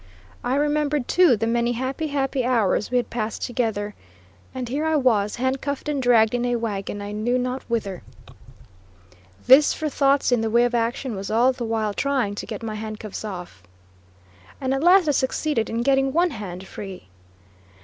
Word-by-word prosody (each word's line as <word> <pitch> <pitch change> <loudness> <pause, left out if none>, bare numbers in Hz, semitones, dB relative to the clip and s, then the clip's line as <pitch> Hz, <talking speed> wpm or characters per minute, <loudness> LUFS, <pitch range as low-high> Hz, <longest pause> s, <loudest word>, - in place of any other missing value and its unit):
I 250 - 0
remembered, 295 -2 0
too, 350 -10 +5
the 225 - -1
many 235 +1 +1
happy, 260 +6 -3
happy 270 -2 -1
hours 225 -5 +1
we 250 - +1
had 245 - -1
passed 225 -2 -3
together. 220 -4 -2 0.6
And 255 -1 -5
here 305 +5 0
was 220 -7 +1
I, 245 - -4
handcuffed 270 +2 -2
and 290 -2 -1
dragged 230 -3 +4
in 245 0 0
a 245 0 0
wagon, 205 -3 -3
I 205 - -6
knew 220 +4 0
not 255 +1 -2
whither. 205 -5 -2 1.4
This 275 +3 +6
for 310 -1 -2
thoughts 275 -1 +2
in 245 -2 +3
the 225 - -1
way 235 +2 +4
of 245 - -1
action, 235 +1 -1
was 195 0 -5
all 235 +4 +4
the 250 -2 -5
while 220 -2 -1
trying 260 -5 0
to 205 - -6
get - - -6
my 220 -1 -4
handcuffs 215 -1 -6
off, 180 - -7 1.0
and 265 -1 -1
at 270 - -1
last 355 +1 +5
I - - +4
succeeded 265 -2 0
in 230 +1 -1
getting 270 0 +2
one 345 +2 +2
hand 190 -6 -7
free. 190 - -9
245 Hz, 180 wpm, -23 LUFS, 215-270 Hz, 1.4 s, This